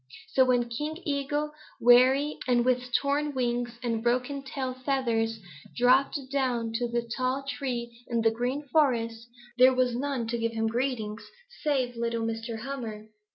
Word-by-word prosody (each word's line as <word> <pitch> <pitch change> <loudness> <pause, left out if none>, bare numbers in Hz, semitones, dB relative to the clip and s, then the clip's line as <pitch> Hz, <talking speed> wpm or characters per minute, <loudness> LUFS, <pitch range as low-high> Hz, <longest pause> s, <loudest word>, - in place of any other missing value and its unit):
So 260 - +4
when 245 -1 +2
King 295 +7 -4
Eagle, 290 +1 -1 0.3
weary 260 +5 +5
and 240 -1 +3
with 250 0 +1
torn 285 +2 +1
wings 240 -1 -1
and 230 -2 -1
broken 250 +4 0
tail 265 -1 -4
feathers, 240 -4 0 0.4
dropped 255 +4 +4
down 245 -5 0
to 240 0 -1
the 235 0 -2
tall 255 +1 -1
tree 240 -4 -4
in 235 -1 0
the 225 - +4
Green 250 +6 -2
Forest, 235 -5 +1 0.3
there 255 +1 +7
was 250 -1 +2
none 265 -2 -2
to 235 0 -1
give 230 0 -1
him 225 0 -1
greeting 225 -2 -1 0.4
save 260 -5 0
little 230 0 -1
Mr. 225 0 -4
Hummer. 225 -5 -6
245 Hz, 155 wpm, -28 LUFS, 235-270 Hz, 0.4 s, there